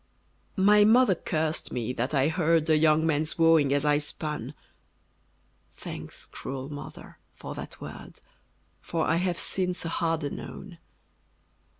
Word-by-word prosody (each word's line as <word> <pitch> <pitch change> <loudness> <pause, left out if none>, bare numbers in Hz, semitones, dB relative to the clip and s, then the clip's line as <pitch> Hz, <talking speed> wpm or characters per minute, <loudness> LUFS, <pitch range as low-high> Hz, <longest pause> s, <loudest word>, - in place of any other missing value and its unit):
My 205 +1 +5
mother 225 0 +5
cursed 160 -2 -2
me 125 0 -3
that 125 +2 -2
I 140 -2 +2
heard 165 -1 +2
A - - +6
young 155 0 +3
man's 155 0 +1
wooing 165 -4 +4
as 145 +1 +1
I 145 0 +3
spun: 150 0 -5 1.2
Thanks, - - -8
cruel 135 0 -7
mother, 145 - -10 0.2
for - - -8
that - - -9
word, - - -10 0.6
For 165 -1 -2
I 165 - +2
have, 180 -1 -1
since, 180 -2 0
a - - -2
harder 165 -3 -1
known! 180 -4 -9
160 Hz, 135 wpm, -27 LUFS, 150-170 Hz, 1.2 s, A